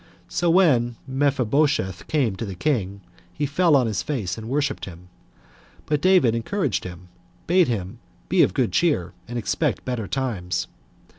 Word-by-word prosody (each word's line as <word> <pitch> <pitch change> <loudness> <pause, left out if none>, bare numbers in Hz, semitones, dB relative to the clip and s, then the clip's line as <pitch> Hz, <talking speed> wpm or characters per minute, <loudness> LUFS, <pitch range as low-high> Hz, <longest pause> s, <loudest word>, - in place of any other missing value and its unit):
So 175 - 0
when 135 -10 +4
Mephibosheth 135 - 0
came 130 -10 +1
to - - -4
the 95 - -6
king, 100 - -1 0.3
he 145 - -2
fell 155 +3 +3
on 130 -3 +4
his 110 -3 -1
face 120 -12 -3
and 110 0 -8
worshipped 145 +2 -1
him; 90 -1 -12 0.8
but 150 -1 0
David 180 -11 +4
encouraged 130 - -1
him, 90 0 -9 0.4
bade 180 0 +4
him 95 -6 -3 0.3
be - - +3
of 90 - +3
good 125 -4 +1
cheer, 100 - +1
and 120 - -5
expect 115 - -1
better 120 -5 -3
times. 100 -10 -2
125 Hz, 155 wpm, -23 LUFS, 95-150 Hz, 0.8 s, when